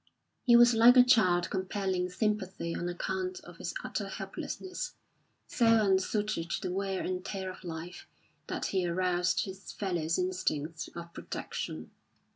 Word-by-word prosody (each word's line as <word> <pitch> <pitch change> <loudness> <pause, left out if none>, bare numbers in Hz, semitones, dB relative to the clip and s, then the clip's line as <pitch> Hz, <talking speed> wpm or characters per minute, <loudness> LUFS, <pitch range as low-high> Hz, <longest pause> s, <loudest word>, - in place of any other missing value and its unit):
He 240 -2 +5
was 240 0 +8
like 235 +3 +7
a 250 - +10
child 185 -8 +4
compelling 190 -1 -1
sympathy 190 -4 -1
on 175 - -2
account 370 - -3
of - - -13
its - - -3
utter - - -3
helplessness, 370 -1 -5 0.5
so 235 - +1 0.2
unsuited 195 -2 +1
to - - -2
the 180 -1 -3
wear 195 0 -1
and 185 0 -2
tear 190 -1 -4
of 185 - -13
life 170 +1 -7 0.4
that - - -3
he 185 -2 +1
aroused 180 0 +1
his 190 0 -8
fellows' 170 -5 -1
instincts 165 -4 -2
of 170 0 -8
protection. 80 0 -5
185 Hz, 145 wpm, -31 LUFS, 175-210 Hz, 0.5 s, a